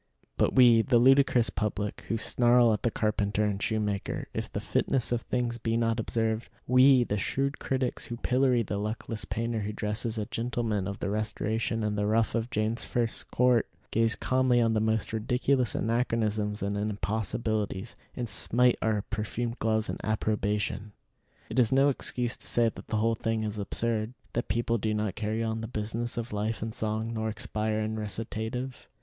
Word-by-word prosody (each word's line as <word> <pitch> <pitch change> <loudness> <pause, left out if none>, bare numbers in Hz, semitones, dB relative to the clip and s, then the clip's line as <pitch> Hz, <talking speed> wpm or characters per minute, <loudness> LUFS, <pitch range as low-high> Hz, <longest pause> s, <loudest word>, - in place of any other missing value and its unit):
But - - +1
we, 120 -3 +7
the 120 +1 +3
ludicrous 130 -1 +5
public, 105 -1 -3
who 115 - 0
snarl 120 0 +4
at 105 - -2
the 120 - +1
carpenter 105 -1 0
and 100 -1 -1
shoemaker 105 -3 -2
if - - -4
the - - -3
fitness 130 -4 0
of 120 -1 +1
things 120 -1 -2
be 115 0 0
not 115 0 +1
observed; 110 0 -1 0.2
we, 130 0 +6
the 105 -3 -2
shrewd 140 +8 -1
critics, 130 -2 -1
who 120 - -6
pillory 125 -1 +2
the 100 -1 -3
luckless 110 0 -4
painter 115 +2 -2
who 105 0 -3
dresses 110 +2 -2
a 105 - -1
gentleman 115 -4 -2
of 100 0 -4
the 100 - -3
Restoration 110 +1 -1
in 105 -1 0
the 105 0 0
ruff 110 +1 +2
of 115 0 -1
James 110 0 -1
First's 120 -2 -1
court, 125 -2 +2 0.2
gaze 115 +1 +3
calmly 130 -1 +2
on 115 -1 +3
the 110 - +2
most 110 0 0
ridiculous 125 +1 +1
anachronisms 110 -3 0
and 100 +1 -1
impossibilities, 105 0 -2 0.2
and 120 -1 -3
smite 125 +3 +2
our 110 -2 +1
perfumed 115 +3 -3
gloves 110 -1 +1
in - - -3
approbation. 105 -1 -1 0.5
It - - -1
is 120 -3 +4
no 135 +2 +5
excuse 125 -2 0
to - - -6
say 115 -1 +3
that - - -11
the 110 - -1
whole 115 +2 +2
thing 115 0 -1
is 105 -1 -3
absurd; 110 +2 -1 0.2
that 120 - -1
people 115 +2 0
do 110 +1 0
not 105 -3 -1
carry 110 +2 -2
on 110 0 -2
the 115 - -4
business 115 +2 -3
of 120 -1 -4
life 105 +2 -2
in 110 - -3
song, 110 +1 -2
nor 110 -1 -2
expire 110 0 -1
in 110 0 -2
recitative. 110 +4 -4
110 Hz, 180 wpm, -28 LUFS, 105-120 Hz, 0.5 s, we